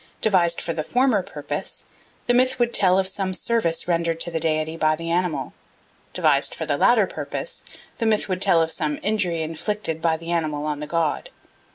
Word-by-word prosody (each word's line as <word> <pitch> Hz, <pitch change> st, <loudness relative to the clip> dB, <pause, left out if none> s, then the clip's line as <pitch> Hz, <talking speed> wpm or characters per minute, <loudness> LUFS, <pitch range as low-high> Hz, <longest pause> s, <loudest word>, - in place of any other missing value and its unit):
Devised 175 Hz, -5 st, +3 dB
for 165 Hz, -, -3 dB
the 155 Hz, -1 st, -3 dB
former 250 Hz, -, +2 dB
purpose, -, -, -6 dB, 0.4 s
the 245 Hz, -, +2 dB
myth 255 Hz, +1 st, +3 dB
would 240 Hz, -1 st, +1 dB
tell 185 Hz, -2 st, +4 dB
of 190 Hz, -1 st, +1 dB
some 190 Hz, -1 st, -3 dB
service 180 Hz, -10 st, 0 dB
rendered 170 Hz, -1 st, 0 dB
to 170 Hz, -, +1 dB
the 165 Hz, -, -1 dB
deity 155 Hz, 0 st, 0 dB
by 155 Hz, -1 st, +2 dB
the 165 Hz, +1 st, -5 dB
animal; 175 Hz, -2 st, -1 dB, 0.6 s
devised -, -, +2 dB
for -, -, -4 dB
the -, -, 0 dB
latter -, -, +4 dB
purpose, -, -, -6 dB, 0.4 s
the 230 Hz, -, +1 dB
myth 215 Hz, -1 st, +2 dB
would 185 Hz, -1 st, -2 dB
tell 175 Hz, -5 st, +5 dB
of 160 Hz, -, -3 dB
some 150 Hz, -3 st, -2 dB
injury 185 Hz, -5 st, 0 dB
inflicted 165 Hz, +1 st, -2 dB
by 165 Hz, -1 st, +2 dB
the 165 Hz, +1 st, -6 dB
animal 155 Hz, -3 st, -1 dB
on 150 Hz, -1 st, -2 dB
the 150 Hz, -, -5 dB
god. 165 Hz, -1 st, -1 dB
170 Hz, 195 wpm, -23 LUFS, 160-200 Hz, 0.6 s, tell